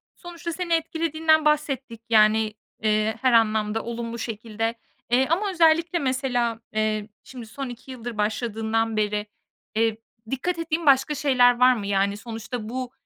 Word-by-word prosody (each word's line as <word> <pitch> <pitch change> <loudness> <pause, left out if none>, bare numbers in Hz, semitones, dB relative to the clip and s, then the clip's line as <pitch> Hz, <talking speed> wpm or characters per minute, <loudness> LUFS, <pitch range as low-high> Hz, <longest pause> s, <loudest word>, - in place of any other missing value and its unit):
sonuçta 345 -1 -7
seni 345 -1 -2
etkilediğinden 320 -1 +1
bahsettik. 275 -6 0
Yani, 215 0 +4 0.3
eee, 215 0 +1
her 255 -2 +3
anlamda 220 -1 +2
olumlu 235 0 -5
şekilde, 225 0 -3 0.3
eee, 255 +2 +3
ama 395 +5 +1
özellikle 335 0 +3
mesela, 250 -4 0
eee, 215 0 -1
şimdi 245 -3 -10
son 260 +3 -6
2 245 +2 -10
yıldır 240 -3 -7
başladığından 225 +1 -1
beri, 210 0 0 0.5
eee, 225 0 +1 0.3
dikkat 335 +6 -2
ettiğin 330 0 -2
başka 275 +2 +4
şeyler 250 -4 +4
var 255 0 +7
mı? 205 -4 -5
Yani, 200 0 +1
sonuçta 225 0 -6
bu, 255 0 -4
240 Hz, 140 wpm, -24 LUFS, 220-290 Hz, 0.5 s, var